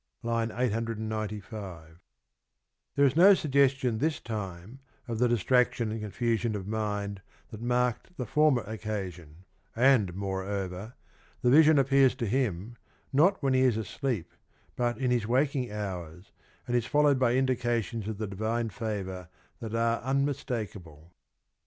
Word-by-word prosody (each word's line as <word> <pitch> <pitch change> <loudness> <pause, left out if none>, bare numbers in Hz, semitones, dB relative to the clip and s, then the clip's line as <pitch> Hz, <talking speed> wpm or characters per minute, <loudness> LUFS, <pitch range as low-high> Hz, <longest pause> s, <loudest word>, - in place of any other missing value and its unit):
(I. 115 -1 0 0.2
895) 110 -6 -4 1.0
There 140 - +4
is 135 0 +2
no 190 +4 +8
suggestion 135 -7 +2
this 155 +3 0
time 105 +1 -6 0.3
of 115 -2 -3
the 125 - +4
distraction 120 0 +2
and 110 0 -4
confusion 115 +1 -1
of 95 -2 -5
mind 105 -2 -3 0.3
that 110 - -9
marked 125 +7 -1
the 125 - -3
former 145 -1 +3
occasion, 95 -6 -6 0.3
and" 115 -7 +3
moreover, 95 +2 -4 0.5
the 125 - +4
vision 155 +2 +7
appears 135 -1 +4
to 125 -3 -3
him, 115 -2 -1 0.4
not 155 +4 +3
when 135 -1 +2
he 130 - +3
is 125 -4 +3
asleep, 110 - -3 0.4
but 120 -1 0
in 125 -1 0
his 120 -3 +1
waking 130 0 +1
hours, 90 -4 -6 0.3
and 120 - -1
is 120 -1 +1
followed 145 -2 +3
by 125 -2 +3
indications 120 -4 0
of 110 -2 -4
the 110 - -3
divine 110 +4 -2
favour 95 -6 -5 0.3
that 115 0 -5
are 115 0 +1
unmistakable. 110 - -3
115 Hz, 135 wpm, -29 LUFS, 100-130 Hz, 1.0 s, no